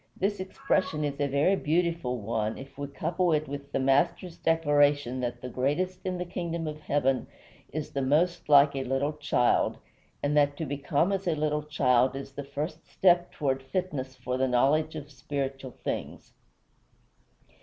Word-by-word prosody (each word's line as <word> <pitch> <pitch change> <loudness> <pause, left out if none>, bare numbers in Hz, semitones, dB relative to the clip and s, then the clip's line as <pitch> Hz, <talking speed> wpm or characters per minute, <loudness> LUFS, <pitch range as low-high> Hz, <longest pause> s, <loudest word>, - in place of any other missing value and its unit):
The 200 +1 0
expression 185 -4 -1
is 145 -1 -2
a 145 - +2
very 140 +8 +3
beautiful 165 -6 0
one 110 0 -2
if 135 +1 -11
we 145 0 -4
couple 170 +4 0
it 155 0 0
with 140 0 -7
the - - 0
Master's 155 +6 +1
declaration 145 -6 +2
that 120 -1 -3
the - - -3
greatest 150 +9 -1
in 185 -1 -1
the 180 - -3
kingdom 170 -1 -3
of 155 0 -5
heaven 135 -4 +1 0.4
is 155 0 -4
the 140 -2 -2
most 155 +6 +1
like 140 -1 +7
a 135 - -1
little 135 +3 0
child, 150 -5 +1 0.5
and 145 +1 +1
that 145 -1 +3
to 160 - -3
become 145 +5 0
as 195 -1 -2
a 165 - +2
little 150 0 0
child 130 -4 +2
is 135 0 -6
the 140 +1 -6
first 155 +4 -5
step 175 -2 +3
toward 135 -3 -1
fitness 135 -2 -3
for 125 0 -3
the 130 0 +2
knowledge 150 +6 +2
of 145 -1 -7
spiritual 135 -2 -4
things. - - -5
145 Hz, 170 wpm, -28 LUFS, 135-165 Hz, 0.5 s, like